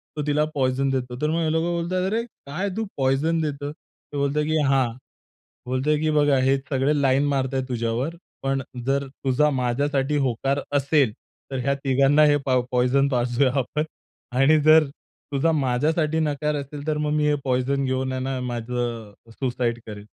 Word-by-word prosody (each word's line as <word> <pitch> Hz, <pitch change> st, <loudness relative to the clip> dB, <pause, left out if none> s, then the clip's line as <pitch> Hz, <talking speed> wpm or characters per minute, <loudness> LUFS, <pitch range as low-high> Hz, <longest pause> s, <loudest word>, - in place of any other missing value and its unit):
तो 150 Hz, -, -2 dB
तिला 150 Hz, +1 st, +2 dB
पॉइझन 135 Hz, 0 st, +1 dB
देतो. 125 Hz, -2 st, -2 dB
तर 150 Hz, -, +1 dB
मग 165 Hz, +1 st, 0 dB
हे 155 Hz, -, +1 dB
लोकं 160 Hz, +2 st, 0 dB
बोलतात, 185 Hz, +2 st, -1 dB
"अरे, 230 Hz, +2 st, 0 dB
काय 190 Hz, -3 st, -5 dB
तू 225 Hz, -, -1 dB
पॉइझन 140 Hz, +5 st, +1 dB
देतो?" 145 Hz, -1 st, -3 dB
तो 150 Hz, -2 st, -13 dB
बोलतो, 140 Hz, +1 st, +1 dB
की 155 Hz, +1 st, 0 dB
हां, 135 Hz, -2 st, +3 dB, 0.8 s
बोलतोय, 130 Hz, +4 st, +1 dB
की 155 Hz, 0 st, +1 dB
"बघा, 145 Hz, -2 st, +3 dB
हे 135 Hz, +1 st, +3 dB
सगळे 135 Hz, +1 st, +2 dB
लाईन 135 Hz, 0 st, +3 dB
मारता 135 Hz, -1 st, 0 dB
आहेत 130 Hz, 0 st, -2 dB
तुझ्यावर, 120 Hz, +6 st, -2 dB, 0.3 s
पण 135 Hz, 0 st, 0 dB, 0.2 s
जर 140 Hz, +1 st, +1 dB
तुझा 135 Hz, +2 st, +1 dB
माझ्यासाठी 135 Hz, +3 st, 0 dB
होकार 135 Hz, +3 st, 0 dB, 0.2 s
असेल, 140 Hz, -3 st, +2 dB, 0.4 s
तर 135 Hz, -, -3 dB
ह्या 140 Hz, +1 st, +2 dB
तिघांना 140 Hz, +2 st, +4 dB
हे 145 Hz, 0 st, +4 dB
पाव 130 Hz, -2 st, +3 dB
पॉइझन 125 Hz, +3 st, +3 dB
पाजूया 125 Hz, 0 st, +1 dB
आपण 150 Hz, +4 st, -1 dB, 0.5 s
आणि 150 Hz, +3 st, +5 dB
जर 155 Hz, +1 st, +6 dB, 0.5 s
तुझा 150 Hz, +4 st, +2 dB
माझ्यासाठी 150 Hz, +3 st, +1 dB
नकार 150 Hz, 0 st, 0 dB
असेल, 145 Hz, +1 st, -8 dB
तर 155 Hz, -1 st, 0 dB
मग 150 Hz, 0 st, -1 dB
मी 150 Hz, -1 st, +2 dB
हे 150 Hz, -, +3 dB
पॉइझन 135 Hz, +1 st, 0 dB
घेऊन 130 Hz, 0 st, -1 dB
आहे 130 Hz, -, -3 dB
ना, 130 Hz, 0 st, -2 dB
माझं 120 Hz, -2 st, -3 dB
अ, -, -, -17 dB
सुसाईड 120 Hz, -1 st, -2 dB
करेन." 105 Hz, -2 st, -8 dB
140 Hz, 175 wpm, -24 LUFS, 130-150 Hz, 0.8 s, जर